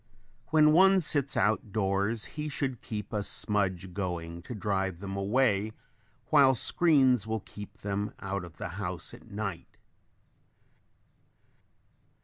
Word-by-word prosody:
When 155 -1 +5
one 190 +4 +6
sits 145 -6 +1
out 105 0 +1
doors 100 +2 0
he 150 0 -4
should 135 -4 -3
keep 105 -1 -6
a 105 - 0
smudge 95 -3 -1
going 85 -3 -4
to 120 +7 -8
drive 95 -4 -2
them 95 0 -6
away 105 0 +1 0.6
while 140 -3 +6
screens 130 - +3
will 110 -1 -2
keep 105 +1 -11
them 100 +1 -3
out 95 -1 -4
of 85 -2 -12
the - - -5
house - - -4
at - - -14
night. 100 -4 -6
105 Hz, 130 wpm, -29 LUFS, 95-130 Hz, 0.6 s, one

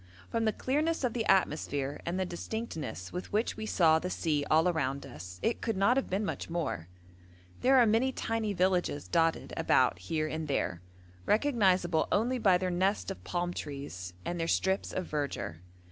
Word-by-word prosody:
From 230 -1 0
the 220 - +3
clearness 300 +8 0
of 245 -3 +1
the 230 -3 -1
atmosphere 145 -5 +1
and 175 +2 -1
the 190 - +1
distinctness 165 - -5
with 180 - -5
which 215 +3 0
we 220 - -5
saw 160 -6 +4
the 180 - -3
sea 155 -5 0
all 160 +3 +4
around 140 -5 -1
us, 90 +4 -9
it 230 - 0
could 225 -4 -1
not 200 +6 +4
have 270 - 0
been 195 +3 0
much - - -4
more. 150 - -2 0.7
There 265 +1 +5
are 245 - +7
many 230 +4 +3
tiny 225 -4 -2
villages 180 -5 +1
dotted 165 -1 +1
about - - +3
here 155 - -1
and 160 0 -4
there, 90 -11 -1 0.5
recognisable 190 - +3
only 245 +4 +1
by 195 -5 +5
their 185 0 -1
nest 190 +3 0
of 195 - -8
palm 175 0 -2
trees 140 - -6
and 175 0 -3
their 165 - -1
strips 190 +3 +1
of 185 - -3
verdure. 140 - -3
180 Hz, 180 wpm, -31 LUFS, 150-220 Hz, 0.7 s, are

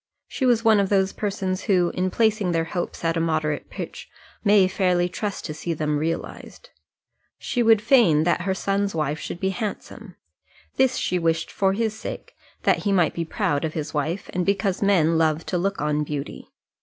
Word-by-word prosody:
She 260 - -1
was 235 -2 +2
one 220 -2 +6
of 195 -1 +1
those 190 -1 +2
persons 195 -2 -3
who, 180 -5 +2
in 185 +1 0
placing 215 -3 +1
their 165 0 +1
hopes 170 0 -4
at 165 0 +1
a - - 0
moderate 155 -2 -1
pitch, - - -7 0.3
may 205 -3 +5
fairly 180 -2 +1
trust 200 +2 -4
to 155 - -4
see 165 +2 -4
them 150 -1 -1
realized. 165 - -5 0.7
She 245 - -2
would 225 -2 +4
fain 215 - +5
that 170 0 +1
her 190 +2 -1
son's 200 0 -1
wife 155 -1 -1
should 170 - -6
be 190 - 0
handsome; 210 +1 -6 0.6
this 260 -1 +3
she 180 - 0
wished 165 -1 0
for 195 -1 +1
his 220 +1 -1
sake, - - -7 0.3
that - - +3
he 205 - -1
might 180 -4 +3
be 170 - -2
proud 145 -1 -1
of 160 -1 -2
his 155 -1 -4
wife, 160 +5 -2
and 180 - 0
because 195 0 0
men 165 -5 +3
love 160 0 +1
to 180 - -1
look 195 +3 -1
on 150 0 0
beauty. 145 -1 -6
180 Hz, 195 wpm, -23 LUFS, 160-200 Hz, 0.7 s, one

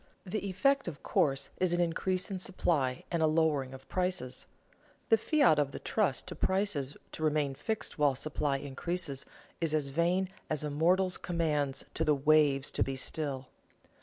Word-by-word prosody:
The 200 +2 -3
effect, 275 +8 +2
of 155 -4 -6
course, 135 -1 +1
is 180 -2 +2
an 175 - +1
increase 180 +2 0
in 190 - -3
supply 155 -9 0
and 170 -2 0
a 160 - +5
lowering 155 -4 +1
of 135 0 -11
prices. 180 -9 -1 0.6
The 225 - +6
fiat 285 - +4
of 140 -2 0
the - - -4
trust - - 0
to - - -7
prices 190 -8 0
to - - -8
remain 150 -2 +1
fixed 220 - -4
while 145 -2 +4
supply 145 0 -1
increases 145 +1 -3 0.3
is 160 -2 +1
as 145 -3 0
vain 175 +6 +1 0.2
as 155 -1 -1
a 150 - -2
mortal's 180 +5 +2
commands 150 -6 -1
to - - 0
the 150 - +3
waves 145 -1 +3
to - - +1
be 135 - -3
still. 135 -1 -3
155 Hz, 170 wpm, -31 LUFS, 140-180 Hz, 0.6 s, The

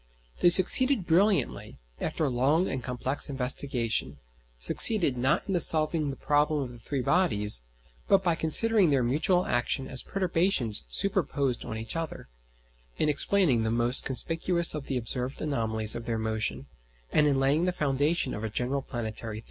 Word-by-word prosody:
They 175 - +4
succeeded 200 +5 +6
brilliantly, 190 +4 0 0.2
after 160 - -3
a - - -1
long 140 +8 0
and 130 - -4
complex 130 +3 -3
investigation: 125 - -2 0.4
succeeded, 165 - +3
not 135 +10 -1
in 190 -3 -1
solving 155 -2 +2
the 135 - -6
problem 150 0 0
of 125 - -8
the 120 - -14
three 130 +3 -4
bodies, 120 - 0 0.5
but, 195 -1 +2
by 175 -2 +1
considering 185 +5 +4
their 135 -3 +1
mutual 160 +9 0
action 120 +2 -2
as 130 - -1
perturbations 170 - -1
superposed 125 - -1
on 110 - -6
each 110 +5 -5
other, 165 -1 -6 0.7
in 155 - 0
explaining 150 - +1
the 110 - -2
most 120 +2 +2
conspicuous 165 +5 +2
of 150 -2 -7
the 135 - -3
observed 125 +2 -4
anomalies 110 -7 -1
of 115 - -7
their 115 -1 -2
motion, 110 -11 -3 0.5
and 150 - +2
in 140 -2 0
laying 140 +5 +1
the 180 - 0
foundation 145 +1 -1
of 105 - -7
a 110 - -3
general 125 +5 -3
planetary 110 -3 -5
theory. - - -7
140 Hz, 165 wpm, -26 LUFS, 120-165 Hz, 0.7 s, succeeded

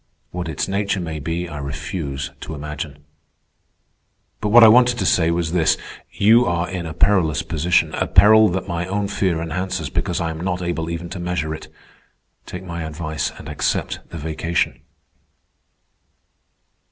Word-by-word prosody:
What 90 -2 -4
its 75 - -2
nature 100 0 -1
may 80 -3 -4
be 85 +4 -3
I 75 -3 -7
refuse 70 0 -4
to 80 - -6
imagine. 75 0 -7 1.3
But 105 - -1
what 120 +2 +8
I - - +10
wanted 125 +2 +6
to - - -1
say 85 -2 +3
was 85 -1 0
this: 85 -3 +3 0.3
You 115 +4 +5
are 85 0 0
in 90 -3 -4
a 80 - -6
perilous 90 -5 +2
position—a 85 +3 +1
peril 110 +1 +7
that 95 +2 -3
my 85 -1 -2
own 100 +1 -1
fear 95 -5 0
enhances 85 -2 -3
because - - -1
I 80 -1 -1
am 80 0 -7
not 90 0 -2
able 85 -2 -2
even 85 +1 -4
to 90 - -6
measure 85 -3 -2
it. 80 - -8 0.8
Take 90 +1 -7
my 85 -2 -5
advice 80 -2 -3
and - - -10
accept - - -1
the - - -7
vacation." 80 +2 -2
85 Hz, 160 wpm, -21 LUFS, 80-95 Hz, 1.3 s, I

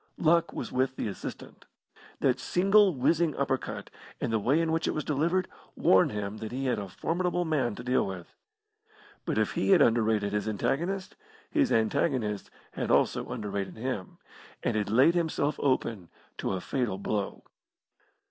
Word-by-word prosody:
Luck 170 0 +3
was - - -5
with 130 +1 0
the - - -3
assistant. 100 - -8 0.6
That - - +2
single 195 0 +4
whizzing 155 +5 +2
uppercut, 135 -1 -2 0.3
and 115 - -2
the 110 - +2
way 135 +9 +2
in 165 -1 +1
which 165 0 0
it - - -1
was 155 - -1
delivered, 170 +6 +1 0.3
warned 95 - +4
him 105 0 -4
that 110 -1 -6
he 135 +2 -3
had 125 -4 +1
a 100 -2 -6
formidable 175 - -1
man 135 -9 0
to 120 - -8
deal 125 -3 +1
with. 95 -3 -8 0.9
But - - -1
if - - +1
he - - -1
had 190 -3 +6
underrated 110 -3 +2
his 105 +1 -1
antagonist, 170 - -1 0.4
his 290 -5 +2
antagonist 110 -2 0 0.2
had - - -4
also - - +2
underrated 100 -2 -4
him, 110 -5 -4 0.5
and 120 - 0
had 105 -2 0
laid 130 +10 +5
himself 160 -4 0
open 115 -9 0 0.3
to - - -1
a 95 - -3
fatal 120 -3 -1
blow. 100 0 -3
130 Hz, 165 wpm, -29 LUFS, 105-165 Hz, 0.9 s, had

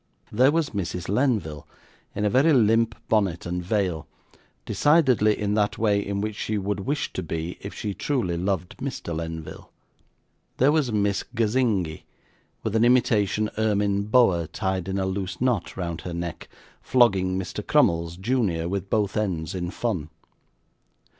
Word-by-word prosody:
There 130 +6 +4
was 160 -2 0
Mrs. 90 -3 -4
Lenville, 105 - 0 0.5
in 105 - -1
a - - +3
very 145 +7 +4
limp 115 -2 +3
bonnet 100 -6 +1
and 90 0 -3
veil, 90 -5 -1 0.6
decidedly 125 - +3
in 105 0 -1
that 105 -1 +1
way 105 -2 +2
in 100 0 -3
which 105 0 -3
she 110 0 -2
would 100 0 -2
wish 140 +9 -2
to - - -3
be 80 +1 -4
if 100 - -6
she 105 -2 -3
truly 115 -8 -1
loved 90 0 -2
Mr. 130 - -5
Lenville; 80 -1 -6 0.9
there 135 +3 +4
was 150 -6 +1
Miss 100 -2 +1
Gazingi, 110 -8 0 0.6
with 110 0 -2
an 110 - +4
imitation 110 -4 +2
ermine 100 -2 +1
boa 105 -8 +3
tied 95 +1 -2
in 95 0 -2
a 95 - 0
loose 95 -1 -3
knot 120 -7 0
round 85 -3 -4
her 90 -2 -6
neck, 85 -1 -5 0.3
flogging 95 -7 +3
Mr. 95 -1 -4
Crummles, 85 0 +2
junior, 95 -6 0
with 95 +1 -3
both 105 -3 0
ends, 90 -7 -2
in 90 -2 -3
fun. 90 -8 -3
100 Hz, 155 wpm, -25 LUFS, 90-115 Hz, 0.9 s, There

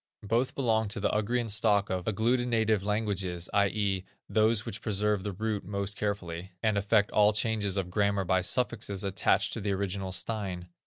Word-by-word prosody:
Both 115 +5 0
belong 110 -5 +1
to 100 - -2
the 100 - 0
Ugrian 115 +3 0
stock 105 -2 +2
of 90 -1 -2
agglutinative 110 -1 +1
languages, 100 -4 -1
i.e., 100 -1 +1 0.2
those 110 0 +3
which 105 - -6
preserve 105 -1 0
the 100 +1 -3
root 105 +1 -3
most 100 +1 -3
carefully, 95 -3 -4
and 110 -2 +2
effect 100 +1 +2
all 105 0 +4
changes 105 -2 0
of 90 -2 -2
grammar 100 -1 +1
by 95 +1 +2
suffixes 105 -2 -1
attached 100 -1 +1
to 115 - -2
the 100 0 -1
original 95 -1 -2
stein. 95 -3 -2
100 Hz, 165 wpm, -29 LUFS, 95-110 Hz, 0.2 s, all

